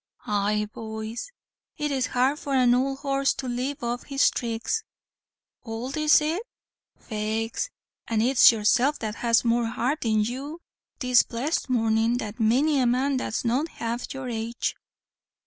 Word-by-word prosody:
"Aye, 210 Hz, -1 st, 0 dB
boys. 220 Hz, -, -6 dB, 0.5 s
It's 280 Hz, -3 st, -1 dB
hard 260 Hz, +4 st, +1 dB
for 280 Hz, -1 st, -2 dB
an 250 Hz, -2 st, +5 dB
owld 270 Hz, +2 st, +1 dB
horse 275 Hz, -1 st, +1 dB
to 265 Hz, -, -5 dB
leave 250 Hz, +3 st, -3 dB
off 240 Hz, +1 st, -3 dB
his 275 Hz, -1 st, +3 dB
thricks." 235 Hz, -, -2 dB, 0.8 s
"Owld 235 Hz, +3 st, -5 dB
is 305 Hz, -1 st, +5 dB
it? 320 Hz, +6 st, -1 dB, 0.6 s
faix 220 Hz, -, -3 dB, 0.4 s
and 225 Hz, -1 st, +1 dB
it's 255 Hz, +1 st, +7 dB
yourself 240 Hz, +6 st, +2 dB
that 215 Hz, -1 st, -5 dB
has 230 Hz, 0 st, +2 dB
more 235 Hz, 0 st, +2 dB
heart 250 Hz, +7 st, -1 dB
in 215 Hz, -2 st, +2 dB
you 275 Hz, +8 st, -5 dB, 0.4 s
this 250 Hz, -2 st, +5 dB
blessed 270 Hz, +5 st, -2 dB
mornin' 225 Hz, -1 st, +2 dB
than 215 Hz, -4 st, -4 dB
many 270 Hz, +7 st, +3 dB
a 250 Hz, -, +3 dB
man 260 Hz, +3 st, +1 dB
that's 250 Hz, -1 st, -3 dB
not 255 Hz, +7 st, +1 dB
half 235 Hz, -5 st, -4 dB
your 265 Hz, -1 st, -5 dB
age." 230 Hz, 0 st, -3 dB
245 Hz, 145 wpm, -25 LUFS, 225-275 Hz, 0.8 s, it's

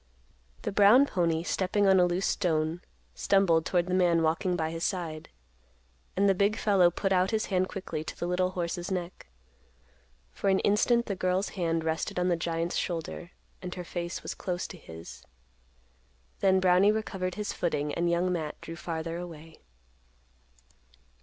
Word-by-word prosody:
The -, -, -2 dB
brown 210 Hz, +7 st, +6 dB
pony, 170 Hz, -8 st, 0 dB
stepping 190 Hz, +3 st, 0 dB
on 190 Hz, -1 st, +5 dB
a 180 Hz, -, +5 dB
loose 175 Hz, +2 st, -1 dB
stone, 160 Hz, -1 st, 0 dB, 0.3 s
stumbled 175 Hz, -5 st, +2 dB
toward 175 Hz, -2 st, +1 dB
the 180 Hz, -, -3 dB
man 175 Hz, -3 st, +3 dB
walking 175 Hz, +3 st, +1 dB
by 160 Hz, -2 st, -1 dB
his 165 Hz, 0 st, -5 dB
side. 165 Hz, -5 st, -3 dB, 0.9 s
And 200 Hz, +1 st, +4 dB
the 195 Hz, -, +5 dB
big 200 Hz, +3 st, +2 dB
fellow 195 Hz, -5 st, +4 dB
put 195 Hz, +3 st, -2 dB
out 185 Hz, 0 st, +3 dB
his 220 Hz, -1 st, 0 dB
hand 185 Hz, 0 st, +2 dB
quickly 185 Hz, -5 st, -5 dB
to -, -, -7 dB
the -, -, -2 dB
little 180 Hz, +1 st, +1 dB
horse's 175 Hz, 0 st, -3 dB
neck. 180 Hz, -1 st, -5 dB, 1.0 s
For 200 Hz, -, -1 dB
an 190 Hz, -, +4 dB
instant, 235 Hz, +3 st, +3 dB
the 200 Hz, -, -3 dB
girl's 185 Hz, +2 st, 0 dB
hand 165 Hz, -4 st, -1 dB
rested 160 Hz, +2 st, -2 dB
on 180 Hz, 0 st, +1 dB
the 175 Hz, -, +3 dB
giant's 165 Hz, +1 st, -2 dB
shoulder, 170 Hz, 0 st, -4 dB, 0.3 s
and 180 Hz, -1 st, -6 dB
her 180 Hz, -, -5 dB
face 175 Hz, 0 st, -5 dB
was -, -, -4 dB
close 180 Hz, -1 st, -3 dB
to 185 Hz, -, -9 dB
his. 80 Hz, -, -11 dB, 1.2 s
Then 190 Hz, -1 st, +4 dB
Brownie 185 Hz, +2 st, +5 dB
recovered 195 Hz, -4 st, -3 dB
his 210 Hz, -1 st, -3 dB
footing, 150 Hz, -4 st, -1 dB
and 170 Hz, 0 st, 0 dB
Young 175 Hz, +2 st, +1 dB
Matt 155 Hz, -3 st, -4 dB
drew 165 Hz, -, -8 dB
farther 165 Hz, 0 st, -4 dB
away. 165 Hz, -2 st, -10 dB
180 Hz, 165 wpm, -28 LUFS, 165-190 Hz, 1.2 s, brown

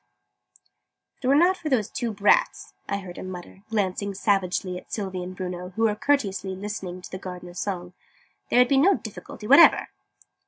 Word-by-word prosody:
"If 270 Hz, -, -8 dB
it -, -, +1 dB
were 275 Hz, -, +5 dB
not 355 Hz, +5 st, +4 dB
for 315 Hz, -, -4 dB
those 240 Hz, -7 st, +1 dB
two 240 Hz, -3 st, -3 dB
brats," 205 Hz, 0 st, +2 dB, 0.2 s
I 200 Hz, -, 0 dB
heard 180 Hz, -2 st, -9 dB
him 185 Hz, -, -6 dB
mutter, 185 Hz, +1 st, -9 dB
glancing 200 Hz, -2 st, -1 dB
savagely 190 Hz, -2 st, 0 dB
at -, -, -21 dB
Sylvie 190 Hz, -3 st, -3 dB
and 180 Hz, +1 st, -7 dB
Bruno, 180 Hz, 0 st, -6 dB
who 225 Hz, -, 0 dB
were 220 Hz, -2 st, +3 dB
courteously 200 Hz, -7 st, 0 dB
listening 190 Hz, -2 st, -6 dB
to -, -, -10 dB
the 185 Hz, -, -6 dB
Gardener's 180 Hz, -1 st, -8 dB
song, 180 Hz, -2 st, -4 dB, 0.6 s
"there -, -, +2 dB
would 250 Hz, -, +6 dB
be 275 Hz, -, +3 dB
no 375 Hz, +7 st, +5 dB
difficulty 210 Hz, 0 st, -9 dB
whatever." 280 Hz, +9 st, +7 dB
195 Hz, 185 wpm, -25 LUFS, 185-225 Hz, 0.6 s, whatever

